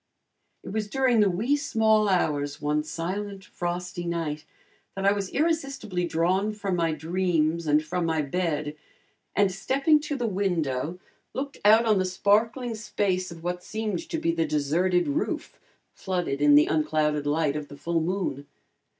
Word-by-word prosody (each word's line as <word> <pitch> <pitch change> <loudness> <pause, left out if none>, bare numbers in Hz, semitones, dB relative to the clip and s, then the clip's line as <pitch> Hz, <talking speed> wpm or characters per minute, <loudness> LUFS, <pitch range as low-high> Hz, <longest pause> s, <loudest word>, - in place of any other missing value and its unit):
It - - -8
was 210 0 -2
during 255 -1 +2
the 205 -2 +5
wee 220 +11 +1
small 220 -6 +2
hours 145 -6 0
one 150 +1 0
silent, 190 +5 -4
frosty 175 0 -4
night, 160 -3 -3 0.5
that 195 0 -3
I 200 - +6
was 200 -2 -2
irresistibly 275 - -1
drawn 185 +6 +1
from 200 -3 -2
my 165 -2 +1
dreams 165 0 0
and 150 +1 +3
from 170 +2 -1
my 160 -2 +1
bed, 150 -1 -2 0.6
and 200 -2 +3
stepping 275 - +2
to 295 -1 -4
the 245 -3 -2
window 175 - -1 0.4
looked 275 +1 -4
out 220 +3 +6
on 215 -3 +3
the 185 - +1
sparkling 220 +6 +1
space 205 -4 -1
of 170 -1 -11
what 180 0 -3
seemed 215 -4 -3
to - - -2
be 165 - +1
the 165 -1 0
deserted 165 +5 +1
roof, 290 +3 -2 0.3
flooded 175 -7 -2
in 145 0 +6
the 150 - +7
unclouded 150 -1 0
light 150 -1 +1
of 150 -1 -4
the 145 - -11
full 170 +2 -1
moon. 165 -5 -2
180 Hz, 160 wpm, -26 LUFS, 155-210 Hz, 0.6 s, the